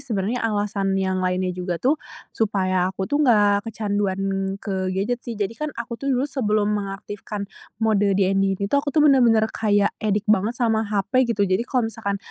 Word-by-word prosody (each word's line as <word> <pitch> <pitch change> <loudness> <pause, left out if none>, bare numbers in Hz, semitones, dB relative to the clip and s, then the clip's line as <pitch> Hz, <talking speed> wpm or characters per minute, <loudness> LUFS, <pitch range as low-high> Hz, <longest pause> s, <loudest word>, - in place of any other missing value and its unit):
sebenarnya 230 -3 -2
alasan 205 -3 0
yang 190 -1 0
lainnya 185 0 0
juga 180 -1 -3
tuh, 280 - +1 0.3
supaya 185 -4 +1
aku 190 0 -4
tuh 290 +6 0
nggak 205 -5 +3
kecanduan 205 -3 -1 0.4
ke 190 -2 -3
gadget 205 +6 -1
sih. 235 -2 -6
Jadi 205 0 -2
kan, 305 +7 -4
aku 235 0 -6
tuh 275 - -3
dulu 260 -1 +1
sebelum 215 -7 0
mengaktifkan 205 0 -5 0.3
mode 205 -3 +2
DND 195 0 +2
ini 200 - -3
tuh, 280 - +4
aku 285 - -5
tuh 300 0 +3
bener-bener 240 -6 +5
kayak 205 -2 +2
addict 210 -1 0
banget 220 +4 0
sama 225 -3 +1
HP, 215 +5 +1
gitu. 205 -3 +1
Jadi 185 +2 +1
kalau 235 -4 0
misalkan 200 -2 -3
205 Hz, 180 wpm, -23 LUFS, 195-230 Hz, 0.4 s, bener-bener